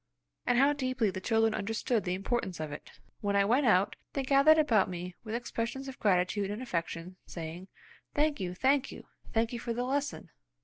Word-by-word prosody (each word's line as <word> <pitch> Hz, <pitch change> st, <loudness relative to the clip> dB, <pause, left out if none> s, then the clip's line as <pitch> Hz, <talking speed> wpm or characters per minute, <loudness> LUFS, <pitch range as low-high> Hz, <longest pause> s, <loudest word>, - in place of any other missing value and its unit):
And 245 Hz, -, +3 dB
how 280 Hz, +3 st, +5 dB
deeply 255 Hz, -7 st, 0 dB
the 190 Hz, -, -6 dB
children 225 Hz, +1 st, +2 dB
understood 225 Hz, +2 st, -1 dB
the 180 Hz, 0 st, 0 dB
importance 195 Hz, -1 st, -2 dB
of 155 Hz, -1 st, -4 dB
it! 145 Hz, -, -8 dB, 0.3 s
When 200 Hz, -1 st, -1 dB
I 200 Hz, 0 st, +4 dB
went 250 Hz, +5 st, +3 dB
out, 195 Hz, -1 st, +4 dB, 0.2 s
they 275 Hz, -, -1 dB
gathered 275 Hz, +4 st, +6 dB
about 230 Hz, -11 st, +3 dB
me 180 Hz, 0 st, -5 dB
with 220 Hz, 0 st, -4 dB
expressions 240 Hz, +2 st, -3 dB
of 270 Hz, 0 st, -8 dB
gratitude 195 Hz, 0 st, +2 dB
and 205 Hz, +2 st, -4 dB
affection, 180 Hz, -5 st, -4 dB
saying, 170 Hz, +2 st, -7 dB, 0.5 s
"Thank 295 Hz, -2 st, +2 dB
you! 180 Hz, -2 st, -3 dB
Thank 270 Hz, +6 st, +2 dB
you! -, -, -10 dB, 0.3 s
Thank 230 Hz, 0 st, +1 dB
you 240 Hz, -, -3 dB
for 235 Hz, 0 st, -3 dB
the 245 Hz, +2 st, -1 dB
lesson!" 280 Hz, +3 st, -2 dB
225 Hz, 190 wpm, -31 LUFS, 185-255 Hz, 0.5 s, gathered